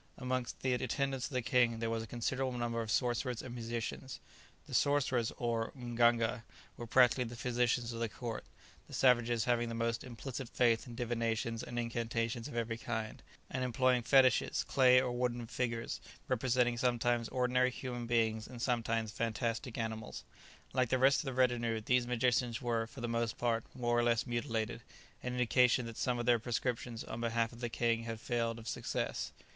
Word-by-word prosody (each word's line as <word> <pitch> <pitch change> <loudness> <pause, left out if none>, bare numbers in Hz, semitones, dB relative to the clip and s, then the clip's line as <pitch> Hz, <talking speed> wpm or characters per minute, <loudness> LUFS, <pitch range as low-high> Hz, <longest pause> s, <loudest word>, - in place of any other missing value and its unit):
Amongst 125 -1 -3
the 130 -1 +1
attendants 130 +1 -1
of - - -14
the 125 -1 0
king 125 -2 +3
there 115 0 -2
was 115 0 -1
a 110 - -7
considerable 130 +2 -2
number 115 -1 -1
of 110 - -5
sorcerers 120 +1 0
and 125 - -7
musicians. 120 +2 -4 0.5
The - - -11
sorcerers, 130 -5 +2
or 115 -2 -1
mganga, 120 -1 +2 0.3
were 120 - -7
practically 125 +1 +5
the 120 +1 -7
physicians 120 0 0
of 115 - -5
the 115 -1 -1
court, 115 -1 -5 0.4
the - - -7
savages 120 -3 +4
having 120 -1 +1
the 115 - -4
most 115 0 -1
implicit 125 +1 -6
faith 120 -1 +2
in 120 - -8
divinations 115 -1 -1
and 120 - -6
incantations 115 0 -2
of 145 - -8
every 115 -1 -2
kind, 110 -1 -4 0.3
and 130 - -3
employing 125 0 +2
fetishes, 130 +1 +4
clay 125 -2 +5
or 125 - 0
wooden 120 -1 -1
figures, 115 0 -3 0.3
representing 120 0 +1
sometimes 120 -1 +1
ordinary 125 0 +2
human 120 -2 -5
beings 110 -2 +1
and 125 - -9
sometimes 115 -2 0
fantastic 115 +2 -2
animals. 110 -1 -4 0.5
Like 130 -2 +2
the 130 - +3
rest 135 +2 +5
of - - -3
the 135 - -3
retinue, 120 -3 +2
these 125 +2 +2
magicians 125 -1 +1
were, 115 -3 -1
for 115 - -10
the 120 - -1
most 115 -1 -1
part, 115 -2 0
more 120 -1 +1
or - - +3
less 115 -1 +2
mutilated, 120 -2 -2 0.4
an 125 - -3
indication 125 0 +3
that 115 -1 -7
some 125 -1 +1
of 120 - -2
their 120 -1 +4
prescriptions 120 0 -2
on 115 - -6
behalf 115 -1 0
of 115 - -12
the 120 -1 -2
king 115 0 0
had 115 -1 -4
failed 115 0 -1
of 115 0 -10
success. - - -2
120 Hz, 180 wpm, -34 LUFS, 115-125 Hz, 0.5 s, practically